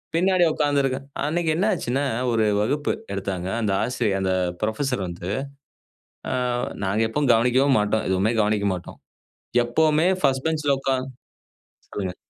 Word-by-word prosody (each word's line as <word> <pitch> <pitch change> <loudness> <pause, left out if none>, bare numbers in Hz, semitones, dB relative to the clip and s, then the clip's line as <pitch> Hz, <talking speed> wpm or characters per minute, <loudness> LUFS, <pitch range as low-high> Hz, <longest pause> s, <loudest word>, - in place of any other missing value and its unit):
பின்னாடி 185 +1 +3
உட்கார்ந்திருக்கேன். 140 -3 0 0.2
அன்னைக்கு 160 +2 0
என்ன 190 +5 +1
ஆச்சுன்னா, 135 -4 -1 0.3
ஒரு 110 -1 +2 0.2
வகுப்பு 145 +7 0 0.2
எடுத்தாங்க. 95 -2 -3
அந்த 105 -3 0
ஆசிரியர் 115 -6 0
அந்த 95 -1 +1 0.3
புரொஃபஸர் 110 0 -1
வந்து, 85 +1 -6 1.0
ஆ - - -1 0.5
நாங்க 100 +3 0
எப்பவும் 140 +2 0
கவனிக்கவே 125 +4 +3
மாட்டோம். 105 +1 0
எதுவுமே 95 +4 +1
கவனிக்க 105 -1 +1
மாட்டோம். 90 - -9 0.7
எப்பவுமே 155 +6 +2
ஃபஸ்ட் 135 +1 +1
பெஞ்ச்ல 150 -3 +1
உட்கார்ந்து 130 -1 -1 0.8
சொல்லுங்க. 95 -3 -4
125 Hz, 125 wpm, -23 LUFS, 105-145 Hz, 1.0 s, பின்னாடி